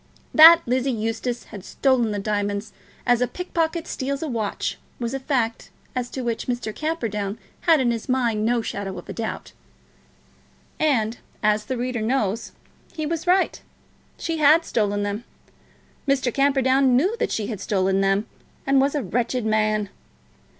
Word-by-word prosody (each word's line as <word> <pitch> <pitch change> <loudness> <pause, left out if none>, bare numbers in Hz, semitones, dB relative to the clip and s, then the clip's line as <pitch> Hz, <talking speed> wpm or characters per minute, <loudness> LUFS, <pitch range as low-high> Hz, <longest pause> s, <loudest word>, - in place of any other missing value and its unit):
That 330 +2 +10
Lizzie 255 +2 0
Eustace 225 +1 -2
had 200 -3 -10
stolen 255 -2 +1
the 205 - -2
diamonds, 205 0 -2 0.3
as 245 -1 +3
a 250 - +3
pickpocket 335 -1 -2
steals 275 +3 -3
a - - -2
watch, 225 -6 -3 0.2
was 235 0 -3
a 270 - -2
fact 250 -4 -1 0.3
as 245 -1 -2
to 260 - -5
which 235 -2 -2
Mr. 240 -3 -2
Camperdown 220 -10 -2 0.3
had 320 -2 +7
in 245 -2 +2
his 230 +1 -4
mind 235 -4 +1
no 235 +1 +1
shadow 195 -3 -4
of - - -9
a - - -6
doubt. 225 -1 -5 1.3
And, 240 -7 +1 0.2
as 210 0 +2
the 260 +3 -3
reader 245 -1 -2
knows, 220 -2 -1 0.4
he 310 -2 -4
was 330 +2 -3
right. 370 +1 +2 0.6
She 330 -1 -3
had 310 +2 +5
stolen 205 -2 0
them. 205 +3 -3 0.8
Mr. 260 -3 +1
Camperdown 270 -2 +3
knew 365 - +2
that - - -1
she 215 - -1
had 210 -3 -5
stolen 195 -1 +1
them, 195 +2 +2 0.4
and 275 0 +4
was 275 +2 +1
a 290 - 0
wretched 240 +4 -1
man. 215 -1 +1
240 Hz, 160 wpm, -23 LUFS, 215-275 Hz, 1.3 s, That